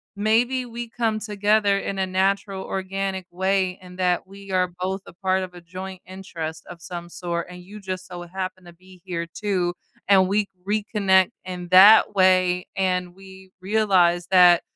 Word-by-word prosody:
maybe 235 +5 +1
we 235 0 -6
come 225 -2 -1
together 210 -1 +1
in 195 - -4
a 190 - +1
natural 190 +1 0
organic 190 0 -3
way 190 0 0
and 180 0 -13
that 180 -1 +1
we 195 0 -12
are 185 -1 +1
both 190 +1 -2
a - - -12
part 190 +1 0
of 180 - -8
a - - -9
joint 185 +2 -8
interest 165 -4 -7
of 170 -1 -11
some 175 -1 -7
sort, 170 -1 -4
and 180 0 -11
you 205 +4 -11
just 185 -2 -5
so 180 -1 -8
happen 185 -1 -5
to 175 - -13
be 185 +1 -19
here 170 -3 -4
too, 185 -5 -1 0.3
and 190 -1 +5
we 205 +1 +1 0.2
reconnect 200 -3 +2
in 180 -1 -6
that 200 +4 +8
way, 185 -2 +3
and 180 -2 -1
we 190 0 -14
realize 185 -4 +2
that 180 -2 +6
190 Hz, 170 wpm, -23 LUFS, 180-200 Hz, 0.3 s, that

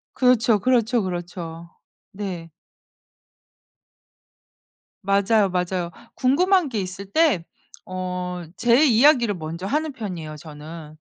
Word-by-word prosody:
그렇죠. 240 -3 +4
그렇죠, 240 +1 +2
그렇죠. 175 -2 -6 0.4
네. 185 -5 -6 2.5
맞아요, 200 +1 +3
맞아요. 180 -1 -1 0.2
궁금한 350 +6 +3
게 220 -5 -2
있을 190 +1 -6
때 290 - +3 0.5
어 180 -1 -4
제 240 +5 +5
이야기를 240 -3 +5
먼저 165 +3 -6
하는 305 +4 -1
편이에요 175 -10 -6
저는. 155 +1 -10
195 Hz, 215 characters per minute, -23 LUFS, 175-240 Hz, 2.5 s, 제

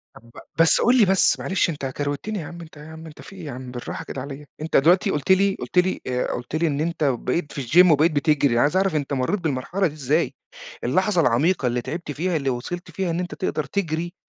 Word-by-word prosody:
طَب 115 +1 -16 0.3
بس 165 -1 +5
قُل 245 +2 +4
لي 225 - +6
بس 190 0 +3
معلش، 190 -1 0
أنت 145 -4 -4
كروِتّني 145 +10 -3
يا 160 - -6
عم 170 +3 -9
أنت، 160 -2 -13
يا 150 - -11
عم 160 0 -10
أنت 155 -2 -12
في 195 - -12
إيه 180 -4 -9
يا 145 - -5
عم، 125 0 -8
بالراحة 125 -1 -6
كده 135 - -6
عليَّ، 140 +2 -8 0.2
أنت 160 - +1
دلوقتي 180 +8 +4
قُلت 150 +3 -1
لي 195 +1 +4
قُلت - - -6
لي 180 +1 +2
آآ، 125 -1 -1
قُلت 120 +5 -5
لي 165 +1 +1
إن 145 -1 -1
أنت 165 -1 -2
بقيت 140 +3 -1
في 140 - -5
الgym 180 +5 +6
وبقيت 155 +3 +4
بتجرِي، 145 -3 +2
أنا 120 - +3
عايز 150 +6 +2
أعرَف 190 -4 +1
أنت 145 -1 -2
مرّيت 135 +10 0
بالمرحلة 165 +5 -1
دي 150 - -7
إزاي؟ 150 +3 0 0.5
اللحظة 185 - +2
العميقة 140 +3 +2
اللي 120 0 -1
تعِبت 155 +5 -5
فيها، 170 +5 -2
اللي 140 -3 0
وصَلت 135 +8 -5
فيها 190 -2 -2
إن 165 - -2
أنت 180 -1 -4
تقدَر 155 -4 -2
تجرِي 170 +1 -3
155 Hz, 240 wpm, -23 LUFS, 140-180 Hz, 0.5 s, لي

